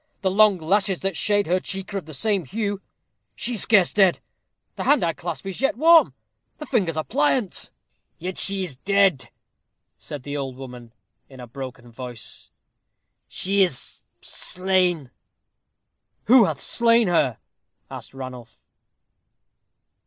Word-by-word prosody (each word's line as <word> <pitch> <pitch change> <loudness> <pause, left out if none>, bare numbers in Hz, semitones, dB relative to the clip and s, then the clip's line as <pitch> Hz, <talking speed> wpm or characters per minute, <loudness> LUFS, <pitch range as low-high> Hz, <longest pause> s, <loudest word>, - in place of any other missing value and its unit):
The 190 - +1
long 210 0 +5
lashes 190 +3 0
that 195 -2 -2
shade 205 +2 +1
her 180 +3 +1
cheek 195 +1 -6
are 195 - -1
of 165 - -16
the 155 - -9
same 200 +3 0
hue. 205 - -3 0.5
She 245 - -2
is 220 - 0
scarce 200 -6 +4
dead. 190 -4 +4 0.6
The - - -4
hand 290 -9 +4
I 165 -1 +1
clasp 165 -3 -6
is 195 +3 -5
yet 270 -3 +1
warm 330 +3 +6 0.4
the 300 - -7
fingers 185 - 0
are 155 - 0
pliant." 180 - 0 0.5
"Yet 185 +2 -5
she 195 -1 -1
is 155 -8 -6
dead," 195 -4 +2 0.7
said 145 -4 -8
the 145 +2 -5
old 135 -3 -4
woman, 125 -3 -10 0.4
in 130 -2 -14
a 125 - -8
broken 125 -1 -9
voice, 120 -2 -7 0.8
"she 195 +2 0
is 175 -9 -1 0.2
slain." 180 -6 0 1.1
"Who 235 0 +6
hath 155 -6 -3
slain 230 -2 +3
her?" 150 -9 +2 0.5
asked - - -9
Ranulph. 125 -3 -9
180 Hz, 145 wpm, -23 LUFS, 135-200 Hz, 1.1 s, warm